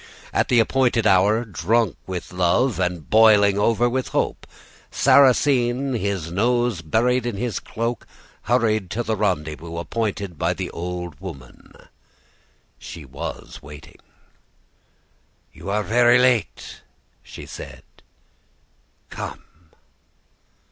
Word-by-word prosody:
At -, -, +1 dB
the 120 Hz, -, +3 dB
appointed 120 Hz, -1 st, +2 dB
hour, 105 Hz, +4 st, +3 dB
drunk 105 Hz, +2 st, 0 dB
with 90 Hz, -1 st, -6 dB
love 95 Hz, +7 st, +1 dB
and 90 Hz, -3 st, -2 dB
boiling 105 Hz, -2 st, +5 dB
over 115 Hz, +2 st, +2 dB
with 130 Hz, +1 st, -2 dB
hope, -, -, -2 dB, 0.4 s
Sarrasine, 130 Hz, -1 st, +3 dB
his 100 Hz, -7 st, -2 dB
nose 120 Hz, 0 st, 0 dB
buried 120 Hz, +9 st, +1 dB
in 115 Hz, -4 st, -3 dB
his 120 Hz, 0 st, -2 dB
cloak, 115 Hz, +1 st, -4 dB, 0.4 s
hurried 110 Hz, -6 st, +1 dB
to 120 Hz, +5 st, -2 dB
the 110 Hz, -1 st, -1 dB
rendezvous 85 Hz, -5 st, -2 dB
appointed 100 Hz, -2 st, -3 dB
by -, -, 0 dB
the -, -, -5 dB
old 90 Hz, -3 st, -6 dB
woman. 70 Hz, -10 st, -11 dB, 1.1 s
She 80 Hz, -3 st, -10 dB
was 70 Hz, +2 st, -8 dB
waiting. 75 Hz, +1 st, -13 dB, 1.5 s
"'You -, -, -9 dB
are 105 Hz, +1 st, 0 dB
very 120 Hz, +3 st, +4 dB
late,' 125 Hz, -3 st, 0 dB, 0.4 s
she -, -, -11 dB
said. -, -, -10 dB, 1.3 s
'Come. -, -, -7 dB
105 Hz, 110 wpm, -22 LUFS, 90-120 Hz, 1.5 s, boiling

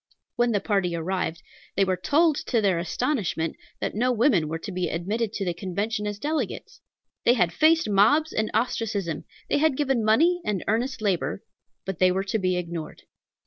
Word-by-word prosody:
When 240 Hz, 0 st, +2 dB
the 205 Hz, -, +2 dB
party 195 Hz, -4 st, 0 dB
arrived, 170 Hz, 0 st, -2 dB, 0.3 s
they 195 Hz, -, +3 dB
were 185 Hz, -1 st, +1 dB
told, 310 Hz, -, +3 dB
to 235 Hz, -, +2 dB
their 195 Hz, -5 st, +2 dB
astonishment, 170 Hz, -, -1 dB, 0.2 s
that -, -, -2 dB
no 245 Hz, +4 st, +1 dB
women 225 Hz, -, +3 dB
were 160 Hz, +2 st, -3 dB
to 195 Hz, +5 st, -7 dB
be 180 Hz, -2 st, -2 dB
admitted 205 Hz, +6 st, -2 dB
to 195 Hz, -, -2 dB
the 175 Hz, -, 0 dB
Convention 205 Hz, +5 st, -3 dB
as 205 Hz, -1 st, -3 dB
delegates. 300 Hz, +8 st, -3 dB, 0.4 s
They 240 Hz, -, +5 dB
had 180 Hz, -8 st, +1 dB
faced 320 Hz, -, +4 dB
mobs 225 Hz, +11 st, +3 dB
and 215 Hz, 0 st, 0 dB
ostracism; 210 Hz, -7 st, -1 dB, 0.2 s
they -, -, +1 dB
had 305 Hz, -3 st, +2 dB
given 270 Hz, -5 st, +1 dB
money 330 Hz, +12 st, +3 dB
and 200 Hz, -4 st, -2 dB
earnest 240 Hz, +3 st, -1 dB
labor, 195 Hz, -1 st, -1 dB, 0.4 s
but 190 Hz, -4 st, -4 dB
they 185 Hz, 0 st, +5 dB
were 190 Hz, +1 st, 0 dB
to 220 Hz, +3 st, -1 dB
be 185 Hz, -1 st, +1 dB
ignored. 170 Hz, -3 st, -6 dB
205 Hz, 185 wpm, -25 LUFS, 180-240 Hz, 0.4 s, They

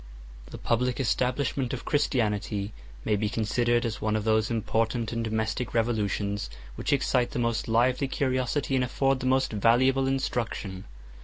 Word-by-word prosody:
The -, -, -8 dB
public 125 Hz, +2 st, 0 dB
establishment 130 Hz, +1 st, 0 dB
of -, -, -5 dB
Christianity 105 Hz, -7 st, 0 dB, 0.3 s
may 105 Hz, -, +2 dB
be 105 Hz, +1 st, 0 dB
considered 120 Hz, +2 st, +1 dB
as 110 Hz, -2 st, -3 dB
one 110 Hz, 0 st, 0 dB
of 110 Hz, -, -1 dB
those 110 Hz, 0 st, +2 dB
important 115 Hz, 0 st, 0 dB
and 115 Hz, -1 st, -2 dB
domestic 110 Hz, +2 st, -2 dB
revolutions 105 Hz, -3 st, 0 dB, 0.2 s
which -, -, -3 dB
excite 130 Hz, -3 st, +2 dB
the -, -, -5 dB
most 115 Hz, -2 st, 0 dB
lively 125 Hz, +4 st, +2 dB
curiosity, 130 Hz, +1 st, -1 dB
and 130 Hz, -1 st, +3 dB
afford 135 Hz, +2 st, +1 dB
the 130 Hz, -, -2 dB
most 130 Hz, -2 st, +2 dB
valuable 130 Hz, +5 st, +3 dB
instruction. 115 Hz, -7 st, -2 dB
120 Hz, 150 wpm, -27 LUFS, 110-130 Hz, 0.3 s, and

